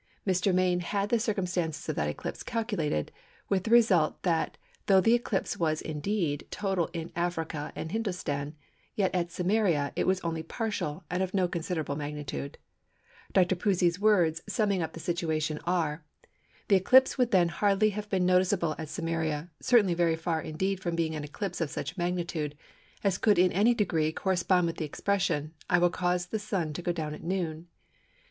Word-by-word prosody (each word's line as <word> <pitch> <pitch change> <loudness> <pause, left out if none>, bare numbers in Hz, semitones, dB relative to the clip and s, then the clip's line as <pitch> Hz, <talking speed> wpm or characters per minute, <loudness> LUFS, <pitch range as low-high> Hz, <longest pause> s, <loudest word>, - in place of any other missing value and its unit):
Mr. 190 0 +2
Main 180 -1 +2
had 200 +3 -1
the 235 - +3
circumstances 180 -7 -2
of - - -1
that 75 - 0
eclipse 75 - -5
calculated, 205 - -2 0.4
with 190 -2 +1
the - - -2
result 215 -10 +4
that 165 -3 0 0.3
though 195 -1 +6
the 225 +5 +4
eclipse 235 -5 0
was 155 -2 +1
indeed 155 -1 -2
total 190 -5 -1
in 165 -1 -5
Africa 165 -3 -2
and 160 - -5
Hindostan, 175 -9 -3 0.4
yet 195 -3 +1
at 175 -2 -1
Samaria 180 -6 +1
it - - 0
was 190 0 +3
only 165 -1 -2
partial 180 -3 -3
and 180 +1 0
of 190 +1 -2
no 185 -2 +3
considerable 165 -4 -3
magnitude. 145 -1 -5 0.7
Dr. 185 -1 +3
Pusey's 180 -2 +1
words, 175 -7 +3
summing 205 -3 +1
up 160 -1 -3
the - - -8
situation 160 -2 -1
are:—"The 165 +3 -2
eclipse 255 +8 +5
then 250 -2 +2
would 175 -3 +4
hardly 205 +1 +4
have 210 +1 -6
been 185 -2 +1
noticeable 180 -2 +2
at 160 -2 -5
Samaria, 165 -2 -2
certainly 225 -8 +4
very 170 -1 +2
far 165 0 -1
indeed 190 +5 -2
from 175 -3 -2
being 165 -1 0
an 150 -1 -4
eclipse 175 +5 -4
of 160 - 0
such 165 - -5
magnitude, 175 -5 -2 0.5
as 195 -2 +1
could 210 -2 +4
in 180 0 +5
any 220 +6 +3
degree 165 -8 +1
correspond 180 0 +1
with 165 -1 -3
the - - -2
expression, 160 -2 -1 0.2
'I 175 - +5
will 175 0 +4
cause 180 0 0
the 215 +4 -3
Sun 185 -7 -2
to 175 - -5
go 175 - 0
down 155 -3 -3
at 150 - -9
noon. 170 -2 -3
175 Hz, 175 wpm, -29 LUFS, 160-195 Hz, 0.7 s, though